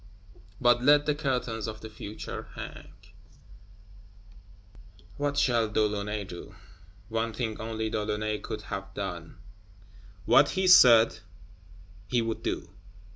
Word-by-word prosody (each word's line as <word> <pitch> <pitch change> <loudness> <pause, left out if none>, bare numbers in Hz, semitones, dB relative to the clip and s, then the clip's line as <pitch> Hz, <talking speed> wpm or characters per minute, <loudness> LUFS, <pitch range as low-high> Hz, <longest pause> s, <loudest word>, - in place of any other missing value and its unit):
But 120 -1 +4
let 145 +2 +5
the 150 - +2
curtains 125 -6 -2
of 110 -1 -7
the 110 - -7
Future 110 -1 -8
hang. - - -9 2.3
What 145 0 -1
shall 120 -5 +2
De 110 0 +1
Launay 105 0 -3
do? 90 -1 -10 0.5
One 115 0 -2
thing 110 -2 -4
only 110 0 -3
De 110 -1 -2
Launay 105 0 -2
could 105 -1 -6
have 95 -1 -7
done: 90 -5 -6 0.9
what 145 +6 +5
he 190 - +2
said 120 -10 +7 0.9
he 120 +4 +1
would 115 -1 -2
do. 85 - -4
110 Hz, 125 wpm, -28 LUFS, 105-120 Hz, 2.3 s, said